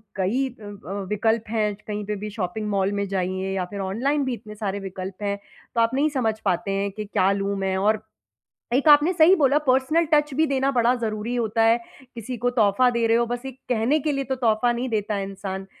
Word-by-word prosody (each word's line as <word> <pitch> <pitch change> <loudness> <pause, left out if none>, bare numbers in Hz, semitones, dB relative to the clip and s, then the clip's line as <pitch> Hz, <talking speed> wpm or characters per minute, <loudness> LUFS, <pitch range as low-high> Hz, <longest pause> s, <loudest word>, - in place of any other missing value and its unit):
कई 225 +8 0
अ - - -11
अ, 205 -2 -9 0.2
विकल्प 220 +1 0
हैं, 215 -2 0
कहीं 210 -1 -4
पे 210 0 -2
भी 210 +1 -5
शॉपिंग 210 +1 -4
मॉल 195 0 +1
में 200 - -1
जाइए 190 0 -2
या 185 -1 -1
फिर 200 - -5
ऑनलाइन 255 +10 0
भी 260 - -1
इतने 210 -1 -9
सारे 200 -2 -3
विकल्प 190 0 -7
हैं, 200 0 -1 0.4
तो 230 - +3
आप 230 +2 +2
नहीं 290 +3 +2
समझ 225 -6 -1
पाते 185 +2 0
हैं 195 0 -1
कि 210 +1 -6
क्या 195 -1 +2
लूँ 200 0 -1
मैं। 190 -1 0
और 215 +2 +2 0.7
एक 280 +4 +3
आपने 295 +4 +7
सही 345 +2 +6
बोला, 285 -1 +4
पर्सनल 270 +6 +3
टच 295 -1 +3
भी 315 +2 +3
देना 270 0 +1
बड़ा 240 -1 +3
ज़रूरी 215 +2 -3
होता 225 -1 +1
है। 225 +1 +5 0.4
किसी 235 +2 -5
को 245 +1 0
तोहफ़ा 235 +1 +3
दे 235 -1 0
रहे 225 - +4
हो, 235 0 +2
बस 240 +1 -4
एक 265 0 -8
कहने 245 +5 +2
के 300 - 0
लिए 275 -1 -1
तो 265 - -2
तोहफ़ा 235 -1 +2
नहीं 240 +2 -3
देता 210 -2 -1
इंसान, 195 -1 -5
220 Hz, 225 wpm, -24 LUFS, 200-255 Hz, 0.7 s, आपने